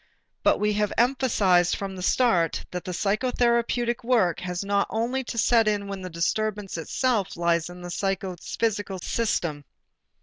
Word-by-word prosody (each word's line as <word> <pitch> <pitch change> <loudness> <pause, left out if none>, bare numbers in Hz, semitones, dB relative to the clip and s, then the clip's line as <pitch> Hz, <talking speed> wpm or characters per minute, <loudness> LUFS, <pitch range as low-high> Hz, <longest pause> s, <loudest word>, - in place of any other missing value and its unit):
But - - +3
we 210 0 +1
have 210 0 0
emphasized 225 -8 +3
from 195 -1 -5
the 185 - -7
start 180 -5 +2
that 180 0 -5
the 185 - -4
psychotherapeutic 235 +4 +1
work 230 -9 +2
has 180 0 -4
not 200 0 +1
only 240 +4 -1
to 230 - -6
set 230 -1 +4
in 205 -1 0
when 195 -1 -5
the 185 - -6
disturbance 205 +4 -2
itself 205 - -1
lies 170 -1 +1
in 180 0 -10
the 175 - -6
psychophysical 195 +2 -2
system. 170 -10 -1
200 Hz, 155 wpm, -25 LUFS, 180-230 Hz, -, set